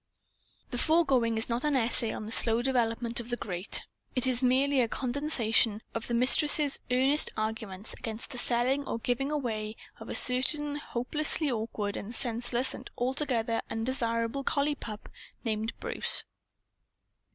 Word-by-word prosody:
The 245 Hz, -, -3 dB
foregoing 265 Hz, -9 st, +2 dB
is 220 Hz, -, +2 dB
not 235 Hz, +1 st, -2 dB
an 300 Hz, -2 st, 0 dB
essay 235 Hz, -2 st, +4 dB
on 215 Hz, -, -6 dB
the 220 Hz, -, -8 dB
slow 230 Hz, +1 st, +3 dB
development 235 Hz, -2 st, -1 dB
of 235 Hz, 0 st, -8 dB
the 240 Hz, -, -2 dB
Great. 180 Hz, -3 st, -3 dB, 0.3 s
It 255 Hz, -, +2 dB
is 255 Hz, -1 st, +1 dB
merely 265 Hz, +2 st, +2 dB
a 235 Hz, -, +1 dB
condensation 240 Hz, -5 st, +1 dB
of 225 Hz, -, -5 dB
the 240 Hz, -, -2 dB
Mistress's 285 Hz, +4 st, +4 dB
earnest 265 Hz, +4 st, +2 dB
arguments 215 Hz, -2 st, -5 dB
against 225 Hz, +1 st, -7 dB
the 245 Hz, -, -5 dB
selling 250 Hz, +4 st, +1 dB
or -, -, -3 dB
giving 245 Hz, +4 st, -2 dB
away 225 Hz, -7 st, -4 dB, 0.2 s
of -, -, -10 dB
a -, -, -2 dB
certain 290 Hz, +4 st, +6 dB
hopelessly 295 Hz, +3 st, -1 dB
awkward 215 Hz, -3 st, -4 dB
and 225 Hz, +4 st, -7 dB
senseless 240 Hz, +1 st, 0 dB
and -, -, -10 dB
altogether 245 Hz, -3 st, -1 dB
undesirable 230 Hz, +2 st, -2 dB
collie 285 Hz, +2 st, 0 dB
pup 215 Hz, -7 st, -9 dB, 0.4 s
named 220 Hz, 0 st, -3 dB
Bruce. -, -, +3 dB
240 Hz, 150 wpm, -28 LUFS, 225-270 Hz, 0.4 s, certain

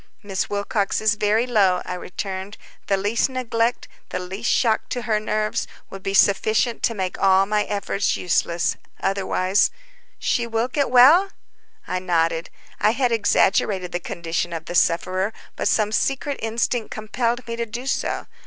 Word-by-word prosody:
"Miss 195 Hz, -2 st, -2 dB
Wilcox 205 Hz, 0 st, -1 dB
is 215 Hz, 0 st, +3 dB
very 210 Hz, +2 st, +1 dB
low," 195 Hz, -7 st, +2 dB
I -, -, -4 dB
returned. 190 Hz, +2 st, -6 dB, 0.3 s
"The 195 Hz, -, +2 dB
least 210 Hz, +6 st, +1 dB
neglect, 240 Hz, -2 st, -1 dB, 0.2 s
the -, -, -3 dB
least 190 Hz, +6 st, -4 dB
shock 225 Hz, -3 st, +2 dB
to 245 Hz, -, -3 dB
her 220 Hz, -3 st, +1 dB
nerves, 215 Hz, 0 st, -1 dB, 0.2 s
would 195 Hz, -, -8 dB
be 195 Hz, +1 st, -2 dB
sufficient 215 Hz, +4 st, +3 dB
to 230 Hz, -, +1 dB
make 190 Hz, -2 st, -3 dB
all 195 Hz, 0 st, +5 dB
my 210 Hz, +1 st, 0 dB
efforts 200 Hz, -1 st, -1 dB
useless. 170 Hz, -1 st, 0 dB, 0.2 s
Otherwise—" 195 Hz, 0 st, +1 dB, 0.5 s
"She 240 Hz, -1 st, 0 dB
will 225 Hz, +2 st, -1 dB
get 280 Hz, +1 st, 0 dB
well?" 285 Hz, +11 st, +7 dB, 0.6 s
I 185 Hz, -, -1 dB
nodded. 165 Hz, -2 st, 0 dB, 0.3 s
I 215 Hz, -, +3 dB
had 250 Hz, -1 st, +1 dB
exaggerated 195 Hz, -4 st, +2 dB
the 175 Hz, -, -2 dB
condition 170 Hz, 0 st, -3 dB
of 165 Hz, -1 st, -5 dB
the 175 Hz, -, -6 dB
sufferer, 185 Hz, +4 st, +1 dB, 0.2 s
but -, -, -1 dB
some 210 Hz, -1 st, +2 dB
secret 275 Hz, +4 st, -1 dB
instinct 225 Hz, +1 st, -1 dB
compelled 235 Hz, +3 st, -2 dB
me 230 Hz, -, -3 dB
to 235 Hz, 0 st, -3 dB
do 240 Hz, +4 st, -6 dB
so. 270 Hz, -, -1 dB
210 Hz, 160 wpm, -22 LUFS, 190-235 Hz, 0.6 s, well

